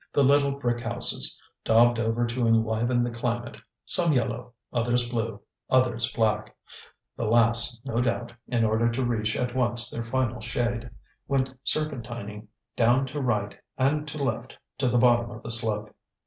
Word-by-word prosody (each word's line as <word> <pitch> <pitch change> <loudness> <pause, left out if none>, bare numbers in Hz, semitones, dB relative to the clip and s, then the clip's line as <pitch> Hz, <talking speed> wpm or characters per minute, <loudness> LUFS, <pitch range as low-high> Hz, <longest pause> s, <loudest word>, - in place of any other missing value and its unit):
The 140 - +4
little 140 +1 +4
brick 120 -4 -1
houses, 120 0 0 0.2
daubed 115 +1 +4
over 115 +1 +1
to 120 0 -1
enliven 115 +2 +2
the 120 - -2
climate, 120 -1 -3 0.3
some 170 -4 +2
yellow, 120 -1 -2 0.2
others 120 +1 +1
blue, 115 -3 -3 0.3
others 120 -2 +2
black 110 -1 0 0.6
the 115 - -3
last, 115 +1 +3
no 120 -3 0
doubt, 120 -1 -1
in 115 -2 +1
order 110 +2 +2
to 125 +2 -1
reach 110 -3 -1
at 125 -1 -2
once 120 -2 +1
their 115 - -4
final 120 -1 -1
shade 120 +1 -2 0.4
went 135 -1 0
serpentining 120 -8 -2 0.3
down 120 +3 +3
to 145 +2 -5
right 105 -5 -1 0.2
and 150 +3 +1
to 150 +1 -6
left 120 0 -3 0.2
to 130 - +2
the 125 - +2
bottom 120 -1 +4
of 115 -1 -10
the 115 - -5
slope. 110 -2 0
120 Hz, 160 wpm, -26 LUFS, 115-125 Hz, 0.6 s, The